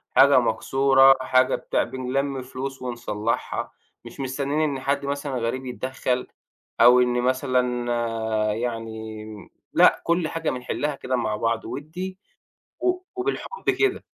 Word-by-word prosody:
حاجة 135 +1 +7
مكسورة، 135 +3 +4
حاجة 130 0 +3
بتاع، - - 0
بنلم 135 +1 -2
فلوس 135 +1 -6
ونصلّحها، 115 -3 -3 0.3
مش - - -11
مستنّيين 140 +2 -2
إن 140 -3 0
حد 140 +1 -1
مثلًا 140 0 -3
غريب 120 +3 -2
يتدخّل 130 0 -2 0.5
أو 125 +1 +8
إن 125 0 +2
مثلًا 125 -1 0 0.7
يعني 110 -2 -5
م 105 -2 -11 0.2
لأ، - - +5
كل 170 -1 +1
حاجة 165 0 -2
بنحلّها 135 +3 -2
كده 130 -1 -2
مع 115 -3 -1
بعض 115 +1 -1
ودّي 180 +6 -6 0.6
و 365 0 +1 0.2
وبالحُب 410 +5 -2
كده. 400 -2 +1
130 Hz, 125 wpm, -24 LUFS, 120-140 Hz, 0.7 s, أو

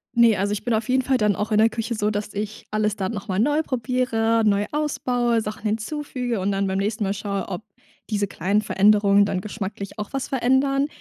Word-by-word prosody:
Ne, 235 -2 +6
also 200 +2 0
ich 210 - -4
bin 240 - 0
auf 220 +1 -1
jeden 260 +1 +3
Fall 265 0 +2
dann 210 -3 +2
auch 210 +2 -3
in 210 - +3
der 220 +1 +5
Küche 225 +1 -3
so, 210 -2 0
dass 205 0 -3
ich 210 +1 -5
alles 215 -1 0
dann 195 0 -2
noch 205 -3 -6
mal 185 0 -1
neu 290 +7 +3
probiere, 235 -4 0
neu 205 -1 +3
ausbaue, 245 -6 0
Sachen 210 0 -6
hinzufüge 245 +2 -2
und 190 +2 0
dann 195 0 0
beim 190 0 -1
nächsten 210 +2 -1
Mal 195 0 0
schaue, 200 -1 -3
ob 195 +2 -5 0.5
diese 205 -2 0
kleinen 200 +3 0
Veränderungen 205 0 +4
dann 190 -2 -2
geschmacklich 200 -1 -6
auch 210 - -5
was 270 -1 -3
verändern. 275 +1 +2
215 Hz, 220 wpm, -23 LUFS, 205-245 Hz, 0.5 s, Ne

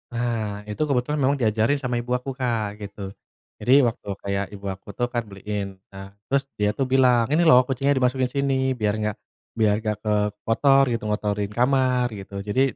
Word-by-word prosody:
Nah, 110 -4 -3
itu 105 +7 -5
kebetulan 145 0 0
memang 140 +2 +2
diajarin 110 +4 +2
sama 125 -3 -2
ibu 120 +1 -3
aku, 125 +1 -2
Kak, 115 -5 -1
gitu. 100 -1 -8 0.5
Jadi 130 +3 +6
waktu 115 - -5
kayak 100 0 -2
ibu 100 -1 -8
aku 95 +1 -6
tuh 120 +5 -1
kan 120 -1 -2
beliin. 100 -1 -6
Nah, 95 0 -10 0.2
terus 135 0 +1 0.2
dia 105 0 +1
tuh 135 - 0
bilang, 130 -2 +3
ini 165 +3 +3
loh 125 -4 +7
kucingnya 135 +2 0
dimasukin 130 0 +1
sini 130 0 0
biar 105 -3 0
gak 105 -1 -1 0.4
biar 110 -2 +3
gak 105 -1 -1
ke 105 - 0 0.3
kotor 135 +4 +4
gitu, 115 -1 -2
ngotorin 105 -1 -1
kamar 125 -1 +2
gitu. 100 -1 -7
Jadi 130 +7 +1
120 Hz, 185 wpm, -24 LUFS, 105-130 Hz, 0.5 s, loh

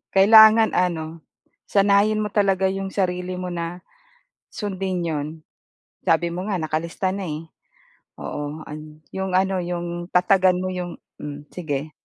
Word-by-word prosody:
Kailangan 220 +2 +8
ano, 165 -2 -1 0.5
sanayin 205 +2 +3
mo 210 - -4
talaga 195 -2 +2
'yong 195 0 -3
sarili 180 -1 -1
mo 180 0 -4
na, 175 +1 -5 0.7
sundin 190 -3 -3
'yon. 150 -3 -2 0.8
Sabi 170 -1 +2
mo 180 +2 -4
nga 190 - 0
nakalista 165 +4 -2
na, 200 - -4
eh. 155 0 -5 0.7
Oo, 150 +2 -5
an 155 0 -10
'yong 190 -1 -3
ano, 190 0 +2
'yong 175 -1 -4
tatagan 185 0 +4
mo 185 - -2
'yong 180 -2 -5 0.2
mm, 145 0 -8
sige. 155 -3 -4
180 Hz, 135 wpm, -23 LUFS, 165-195 Hz, 0.8 s, Kailangan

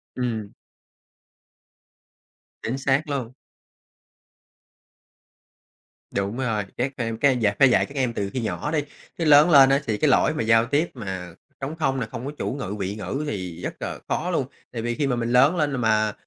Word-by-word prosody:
Ừm. 115 -5 -3 2.1
Chính 120 +4 -3
xác 135 +3 +1
luôn. 130 -4 -3 2.8
Đúng 100 +3 -2
rồi, 115 -5 -1
các 130 +3 -1
em 115 -3 -2
các 140 - +4
em 130 -2 +1
dạy 105 -3 +1
phải 135 - +7
dạy 120 - +3
các 140 - -13
em 130 -4 0
từ 100 -3 -2
khi 130 +4 -3
nhỏ 115 +6 -3
đi, 160 - +1 0.4
chứ 165 - -1
lớn 150 +2 +7
lên 140 -4 +8
á, 135 +1 +4
thì 110 -2 0
cái - - +2
lỗi - - +3
mà - - -2
giao 115 +1 +4
tiếp 145 +7 +1
mà 95 -7 -6 0.3
trống 140 +4 -4
không 135 -3 +1
này, 120 - -3
không 115 - -6
có 140 - -3
chủ - - -2
ngữ, 125 -8 -4
vị 100 +1 -3
ngữ 135 +7 -4
thì 90 - -5
rất - - -4
là - - -4
khó - - -1
luôn. - - 0 0.2
Tại 115 - -4
vì 120 +1 -2
khi 140 +3 0
mà 125 - +1
mình 120 0 -2
lớn 135 +7 +5
lên 150 -4 +1
mà, 110 -2 +2
125 Hz, 190 wpm, -24 LUFS, 110-140 Hz, 2.8 s, lên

